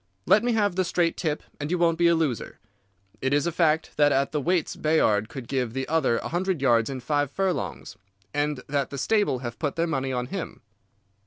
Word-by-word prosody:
Let 210 - +5
me 240 0 +1
have 205 -4 +1
the 185 - +3
straight 175 -1 +1
tip 155 -4 -2 0.2
and 145 0 -3
you 180 - +1
won't 170 -1 +2
be 170 - +5
a 170 - +4
loser. 150 -8 -2 0.6
Is 140 +2 +1
it - - +1
a - - -5
fact 160 -1 +1
that 145 -1 +5
at 135 0 +1
the 150 - -1
weights 175 +2 0
Bayard 110 -9 +2
could 130 -5 -8
give 125 -4 -1
the 135 0 -3
other 155 -7 +2
a - - -4
hundred 180 0 -1
yards 120 -3 +3
in 130 -2 -5
five 145 +2 0
furlongs, 180 - -3 0.4
and 145 -2 -1
that 140 -2 -1
the 140 - -6
stable 205 - +1
have 120 0 -6
put 145 -3 -2
their 165 - +1
money 135 -5 -2
on 125 -1 -1
him? - - -5
150 Hz, 220 wpm, -26 LUFS, 130-170 Hz, 0.6 s, Let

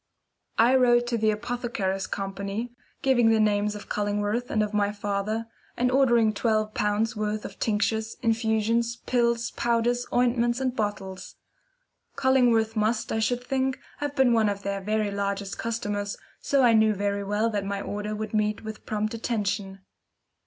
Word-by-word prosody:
I 235 +3 +5
wrote 240 -2 +4
to 235 - 0
the 215 0 +3
Apothecaries' 215 -4 -2
Company, 200 +4 -4 0.3
giving 245 -4 +4
the 225 -1 +4
names 210 0 +2
of 210 - -9
Cullingworth 205 +3 -1
and 215 - +1
of 210 0 -4
my 205 -1 +2
father, 205 +2 -2 0.3
and 250 +1 +2
ordering 240 -5 +4
twelve 215 0 0
pounds' 210 +3 0
worth 210 0 -2
of - - -9
tinctures, 220 +1 0
infusions, 225 +1 +1
pills, 235 -1 +1
powders, 240 +1 0
ointments, 240 0 +2
and 260 -1 -1
bottles. 200 -4 -4 0.8
Cullingworth 240 -4 +3
must, 220 +2 0
I 220 - 0
should 245 +3 0
think, 265 0 -1 0.2
have 290 -1 -3
been 265 -3 +4
one 220 -2 +3
of 200 -1 -4
their 200 0 -2
very 215 +1 0
largest 200 -1 -3
customers, 205 -3 -3 0.2
so 275 -2 +2
I 240 -2 +6
knew 220 -1 +4
very 200 0 -1
well 210 +3 0
that 205 -2 -1
my 200 0 -3
order 210 +1 -4
would 215 0 -5
meet 210 0 0
with 220 0 -8
prompt 215 0 -1
attention. 205 -4 -2
220 Hz, 160 wpm, -26 LUFS, 205-235 Hz, 0.8 s, I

